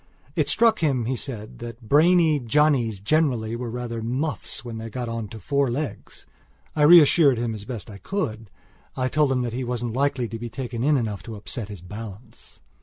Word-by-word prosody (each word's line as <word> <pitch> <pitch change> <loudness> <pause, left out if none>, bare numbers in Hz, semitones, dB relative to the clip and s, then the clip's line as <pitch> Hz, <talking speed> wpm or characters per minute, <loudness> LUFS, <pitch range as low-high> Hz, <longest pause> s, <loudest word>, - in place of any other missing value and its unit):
It - - +1
struck 230 -1 +4
him, 135 -7 +1
he 130 +3 -1
said, 115 -4 -6
that 115 -1 -9
brainy 160 +2 +5
Johnnies 120 -4 +2
generally 115 -1 +1
were 120 0 -4
rather 115 -1 -4
muffs 125 - -3
when 115 -2 -6
they 115 0 -6
got 120 +2 -4
on 115 -2 -4
to 110 - -9
four 140 +4 0
legs. 140 +5 -5 0.5
I 155 - 0
reassured 150 -3 +7
him 115 -1 -1
as 105 -1 -7
best 120 -4 -6
I 100 -3 -10
could. 115 - -3 0.5
I 130 -1 +1
told 145 0 +2
him 130 -1 +1
that 120 -2 -3
he 130 +2 -2
wasn't 120 -2 -3
likely 135 -2 0
to 115 +1 -6
take 125 +1 -6
in 115 0 -2
enough 120 -9 +1
to 115 - -8
upset 105 +1 -5
his 100 -5 -8
balance. 105 +3 -10
120 Hz, 190 wpm, -24 LUFS, 115-140 Hz, 0.5 s, reassured